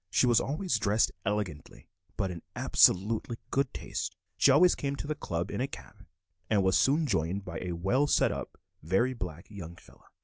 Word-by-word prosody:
She 125 Hz, -, +3 dB
was 120 Hz, -2 st, +4 dB
always 150 Hz, -, -1 dB
dressed 105 Hz, +1 st, +2 dB, 0.2 s
elegantly, 100 Hz, -7 st, -4 dB, 0.3 s
but 95 Hz, -, -1 dB
in 85 Hz, -2 st, -7 dB
absolute 105 Hz, +5 st, +3 dB, 0.2 s
good 135 Hz, -1 st, +1 dB
taste. -, -, -5 dB, 0.2 s
She -, -, +4 dB
always 170 Hz, +7 st, +6 dB
came 140 Hz, 0 st, -3 dB
to 140 Hz, -, -6 dB
the 155 Hz, -, -1 dB
"Club" 85 Hz, -, -4 dB
in -, -, -3 dB
a 135 Hz, -, 0 dB
cab, 65 Hz, -, -12 dB, 0.4 s
and 105 Hz, -3 st, +3 dB
was 95 Hz, 0 st, +3 dB
soon 150 Hz, +4 st, +3 dB
joined 95 Hz, -, -1 dB
by 85 Hz, -2 st, -5 dB
a 90 Hz, -1 st, -3 dB
well 100 Hz, +12 st, +1 dB
set -, -, +3 dB
up, -, -, -6 dB, 0.2 s
very 95 Hz, +11 st, +1 dB
black 90 Hz, -6 st, -7 dB
young 85 Hz, -5 st, -8 dB
fellow. -, -, -20 dB
105 Hz, 190 wpm, -29 LUFS, 90-135 Hz, 0.4 s, always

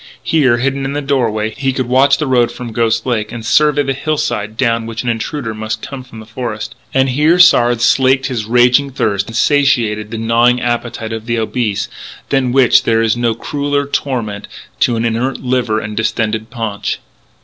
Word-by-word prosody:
Here, 135 Hz, -7 st, +2 dB
hidden 135 Hz, +2 st, -1 dB
in 135 Hz, +1 st, -3 dB
the 145 Hz, -, -2 dB
doorway, 110 Hz, -6 st, 0 dB
he 135 Hz, -1 st, -1 dB
could 130 Hz, 0 st, -2 dB
watch 135 Hz, +3 st, +4 dB
the 155 Hz, -, -2 dB
road 125 Hz, -3 st, +2 dB
from 125 Hz, -2 st, -7 dB
Ghost 115 Hz, 0 st, 0 dB
Lake 110 Hz, -4 st, -1 dB
and 115 Hz, -2 st, -7 dB
survey 150 Hz, +3 st, +3 dB
the 135 Hz, -1 st, -1 dB
hillside 120 Hz, -7 st, -2 dB
down 115 Hz, -3 st, 0 dB
which 115 Hz, +1 st, -5 dB
an 125 Hz, -, -2 dB
intruder 115 Hz, +1 st, -3 dB
must 110 Hz, 0 st, -5 dB
come 135 Hz, -2 st, -7 dB
from 120 Hz, -3 st, -12 dB
the 110 Hz, -, -10 dB
forest. 115 Hz, -1 st, -5 dB, 0.2 s
And 135 Hz, 0 st, +2 dB
here 150 Hz, +7 st, +3 dB
Sard 120 Hz, -9 st, +5 dB
slaked 130 Hz, +2 st, +3 dB
his 120 Hz, -5 st, -3 dB
raging 125 Hz, +4 st, +3 dB
thirst 100 Hz, -7 st, -1 dB
and 115 Hz, -, -8 dB
satiated 120 Hz, -6 st, +2 dB
the 115 Hz, -, -5 dB
gnawing 115 Hz, +2 st, +2 dB
appetite 120 Hz, -2 st, -3 dB
of 110 Hz, 0 st, -6 dB
the 120 Hz, 0 st, 0 dB
obese, 110 Hz, -2 st, -1 dB, 0.4 s
than 135 Hz, -3 st, +1 dB
which 130 Hz, -1 st, +5 dB
there 115 Hz, 0 st, +1 dB
is 110 Hz, 0 st, +2 dB
no 120 Hz, -2 st, 0 dB
crueller 145 Hz, +3 st, -2 dB
torment 120 Hz, -7 st, -3 dB, 0.3 s
to 120 Hz, -, +2 dB
an 115 Hz, +1 st, -1 dB
inert 115 Hz, +4 st, -1 dB
liver 125 Hz, -4 st, 0 dB
and 105 Hz, 0 st, -6 dB
distended 110 Hz, 0 st, -1 dB
paunch. 115 Hz, -4 st, -3 dB
120 Hz, 190 wpm, -15 LUFS, 110-135 Hz, 0.4 s, Sard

